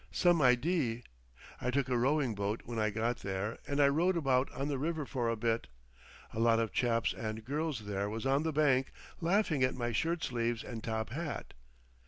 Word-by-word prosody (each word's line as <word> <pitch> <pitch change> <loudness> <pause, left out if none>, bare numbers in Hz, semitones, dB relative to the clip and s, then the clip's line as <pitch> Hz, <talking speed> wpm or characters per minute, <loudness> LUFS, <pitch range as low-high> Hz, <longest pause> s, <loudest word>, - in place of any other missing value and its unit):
Some 175 -3 +3
idee. 125 -1 +2 0.6
I 125 - 0
took 135 +1 +1
a 125 - 0
rowing 130 0 +2
boat 100 +2 -2
when 115 -1 -4
I 110 0 +2
got 115 +3 -1
there 100 +3 -3
and 140 0 -1
I 140 - +7
rowed 170 +6 +2
about 135 -4 +2
on 135 - -3
the 140 -3 -1
river 155 0 -1
for 120 -3 -1
a 115 - +1
bit. 115 +1 0 0.7
A - - -4
lot 115 0 +4
of 115 -1 -1
chaps 115 -2 +1
and 110 0 -5
girls 145 -4 -2
there 100 0 -2
was 110 +3 -4
on 135 +2 +3
the 160 0 0
bank 140 -3 +2 0.3
laughed 190 +3 +2
at 130 -4 +2
my 120 -1 -2
shirt 160 +8 0
sleeves 120 -2 -1
and 115 -3 -7
top 110 -1 -2
hat. 155 +3 -4
125 Hz, 200 wpm, -33 LUFS, 115-145 Hz, 0.7 s, I